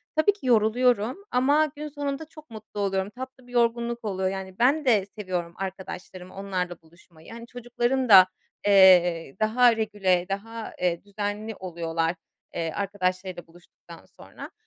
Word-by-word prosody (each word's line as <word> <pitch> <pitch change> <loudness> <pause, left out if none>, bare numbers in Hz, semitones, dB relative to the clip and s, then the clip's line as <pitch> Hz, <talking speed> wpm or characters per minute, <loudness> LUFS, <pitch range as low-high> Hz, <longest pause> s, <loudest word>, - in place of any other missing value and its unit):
Tabii 315 +7 +4
ki 405 - -14
yoruluyorum 240 +1 +2
ama 285 +5 +3
gün 300 +1 -6
sonunda 285 +1 -4
çok 310 -2 -16
mutlu 215 -1 -9
oluyorum, 195 -1 -1
tatlı 260 +2 -10
bir - - -15
yorgunluk 235 0 0
oluyor. 190 -2 -1
Yani, 190 -1 -7
ben 280 +5 +3
de 215 -7 +3
seviyorum 185 -5 -5
arkadaşlarımı, 185 -1 -7
onlarla 185 -3 -4
buluşmayı. 165 +1 -19
Hani, 235 0 -10
çocukların 245 +1 -2
da, 190 -3 +9 0.4
eee, 180 -6 +5
daha 235 +2 +4
regüle, 195 -5 +1
daha, 220 +3 -5
eee, 175 -2 0
düzenli 205 +2 -4
oluyorlar, 165 -2 -2 0.4
eee, 165 -1 -2
arkadaşlarıyla 185 -2 -3
buluştuktan 175 +1 -16
sonra. - - -12
205 Hz, 140 wpm, -25 LUFS, 185-240 Hz, 0.4 s, da